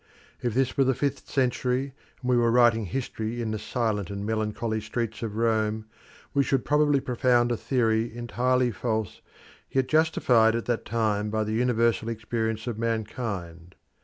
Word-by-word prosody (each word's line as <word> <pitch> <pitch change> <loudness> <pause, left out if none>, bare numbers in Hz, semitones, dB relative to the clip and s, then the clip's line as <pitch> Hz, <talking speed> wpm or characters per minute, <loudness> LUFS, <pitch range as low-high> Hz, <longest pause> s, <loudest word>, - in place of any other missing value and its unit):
If 120 -2 -1
this 130 -1 +1
were 135 - +4
the 130 -1 +2
fifth 140 +1 -2
century, 130 0 0 0.3
and 125 - -3
we - - +4
were 120 -1 +3
writing 115 -2 +4
history 120 -1 -3
in 115 -2 -2
the 110 - -3
silent 105 -5 -1
and 100 0 -4
melancholy 110 +1 -1
streets 110 +1 -3
of 110 -3 -4
Rome, 110 -1 0 0.5
we 140 - +3
should 135 -2 0
probably 150 -1 +3
propound 125 -2 +2
a - - +2
theory 115 -2 +1
entirely 120 +2 0
false, 110 -2 -3 0.5
yet 130 -1 +1
justified 125 -8 +3
at 115 - -2
that 120 -2 -1
time 105 -2 0
by 110 0 0
the 110 0 -3
universal 115 -1 +1
experience 110 0 -2
of 120 -3 -4
mankind. 105 -7 -4
115 Hz, 160 wpm, -26 LUFS, 110-125 Hz, 0.5 s, were